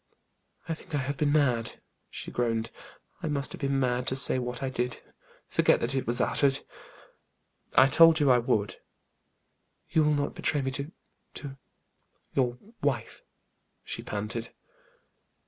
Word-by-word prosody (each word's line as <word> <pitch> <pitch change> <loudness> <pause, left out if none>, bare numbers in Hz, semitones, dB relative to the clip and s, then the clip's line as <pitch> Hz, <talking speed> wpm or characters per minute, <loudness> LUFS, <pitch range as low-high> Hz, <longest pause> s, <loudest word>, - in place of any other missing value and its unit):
"I 165 - -1
think 160 -1 -7
I - - +2
have 140 +1 -2
been 145 0 +2
mad," 125 -6 +1 0.3
she - - -7
groaned. 115 -2 -1 0.5
"I - - -2
must 140 -3 -1
have - - -8
been 140 0 +1
mad 125 -1 0
to 130 - +1
say 130 -1 +4
what 125 +1 -4
I 135 - 0
did. 125 -1 -2 0.5
Forget - - +3
that 120 +3 -1
it 135 -3 -1
was 120 +1 +1
uttered." 140 +1 +2 1.1
"I 130 - +8
told 165 +3 +6
you 145 -3 +4
I 125 - +5
would." 110 -5 0 1.1
"You 160 - +4
will 150 0 +3
not 145 0 -1
betray 145 -3 0
me 135 - -1
to 140 +4 -4 0.4
to 140 -2 -7 0.8
your 125 -2 +1 0.2
wife?" - - -2 0.6
she - - -5
panted. - - -4
135 Hz, 150 wpm, -28 LUFS, 125-145 Hz, 1.1 s, I